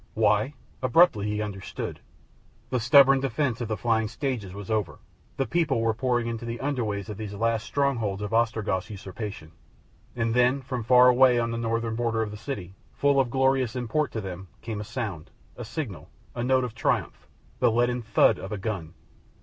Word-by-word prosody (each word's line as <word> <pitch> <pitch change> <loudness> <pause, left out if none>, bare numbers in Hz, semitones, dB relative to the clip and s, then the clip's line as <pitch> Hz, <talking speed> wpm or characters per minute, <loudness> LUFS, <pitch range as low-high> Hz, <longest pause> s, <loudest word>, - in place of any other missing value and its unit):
Why? 145 +2 +2 0.3
Abruptly 130 - +4
he 105 0 -1
understood. 100 -3 -6 0.7
The 125 - +1
stubborn 135 +3 +6
defence 130 -2 -1
of 120 - -2
the 110 -1 -2
flying 110 -2 +1
stages 120 -6 -3
was 100 +2 -7
over, 110 -2 -1 0.4
the 135 - +1
people 145 0 +1
were 115 0 +1
pouring 120 0 0
into 115 0 -4
the 115 0 -4
under 135 -3 -1
ways 100 -2 -3
of 105 -3 -6
these 105 -2 -6
last 115 +2 0
strongholds 115 -8 0
of 105 - -4
Ostrog's 110 -5 0
usurpation. 100 -4 -7 0.6
And 115 -1 0
then, 125 +3 +3
from 125 -2 -4
far 125 +2 +6
away 125 0 +6
on 115 -1 0
the 115 - -3
northern 115 0 -1
border 115 -1 0
of 105 - -5
the 105 - -7
city, 105 -6 -6 0.2
full 140 -1 +2
of 130 -3 +2
glorious 130 -1 +1
import 125 +5 -1
to 110 - -2
him, 95 -1 -7 0.2
came 110 -3 -4
a - - -4
sound, 105 -7 -5 0.3
a 120 - -7
signal, 115 - -6 0.2
a 120 - -3
note 130 +1 +3
of 125 -3 -4
triumph, 115 - -1 0.3
the 125 -2 +4
leaden 120 +2 +1
thud 115 - +3
of 95 - -7
a 105 - -2
gun. 95 -5 -4
115 Hz, 190 wpm, -26 LUFS, 105-125 Hz, 0.7 s, stubborn